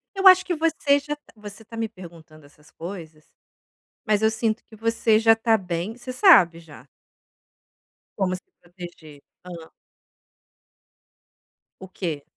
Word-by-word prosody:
Eu 385 Hz, 0 st, +4 dB
acho 370 Hz, 0 st, +7 dB
que 355 Hz, -, -2 dB
você 315 Hz, -3 st, +1 dB
já 295 Hz, +1 st, -5 dB
tá 295 Hz, -, -25 dB
você 210 Hz, 0 st, -11 dB
tá 230 Hz, -, -11 dB
me 225 Hz, 0 st, -2 dB
perguntando 165 Hz, -6 st, -15 dB
essas 150 Hz, +1 st, -22 dB
coisas, 165 Hz, -3 st, -10 dB, 0.8 s
mas 215 Hz, -1 st, +1 dB
eu 220 Hz, -, +4 dB
sinto 220 Hz, 0 st, -2 dB
que 220 Hz, -, -17 dB
você 225 Hz, 0 st, +1 dB
já 225 Hz, 0 st, +5 dB
tá 225 Hz, 0 st, +2 dB
bem, 185 Hz, +2 st, -5 dB
você 250 Hz, +1 st, -8 dB
sabe 190 Hz, -, +5 dB
já 160 Hz, -3 st, -16 dB, 1.3 s
como 185 Hz, -2 st, 0 dB
se 185 Hz, -, -9 dB, 0.2 s
proteger. 175 Hz, -4 st, -13 dB, 0.2 s
Hã. 170 Hz, -3 st, -11 dB, 2.1 s
O 190 Hz, -, -10 dB
quê? 165 Hz, -6 st, -5 dB
205 Hz, 140 wpm, -23 LUFS, 170-230 Hz, 2.1 s, acho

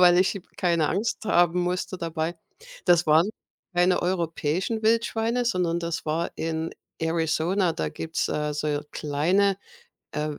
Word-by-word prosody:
weil 175 Hz, -1 st, +7 dB
ich 190 Hz, +1 st, +2 dB, 0.2 s
keine 170 Hz, -4 st, +2 dB
Angst 215 Hz, +4 st, -1 dB
haben 175 Hz, -4 st, +3 dB
musste 180 Hz, +1 st, -2 dB
dabei. 165 Hz, -1 st, -2 dB, 0.5 s
Das 175 Hz, -2 st, +5 dB
waren 160 Hz, +7 st, +5 dB, 0.5 s
keine 180 Hz, +1 st, +3 dB
europäischen 175 Hz, +4 st, -1 dB
Wildschweine, 230 Hz, +2 st, +1 dB
sondern 180 Hz, -6 st, +1 dB
das 170 Hz, -1 st, -3 dB
war 160 Hz, +2 st, -1 dB
in 160 Hz, 0 st, -3 dB, 0.3 s
Arizona. 165 Hz, +3 st, +1 dB
Da 80 Hz, -, -2 dB
gibt's, 160 Hz, -, -2 dB
äh, 150 Hz, 0 st, -1 dB
so 150 Hz, 0 st, -1 dB
kleine, 180 Hz, +7 st, +1 dB, 0.6 s
äh, 150 Hz, 0 st, -2 dB
W 150 Hz, -, -6 dB
170 Hz, 140 wpm, -26 LUFS, 160-185 Hz, 0.6 s, weil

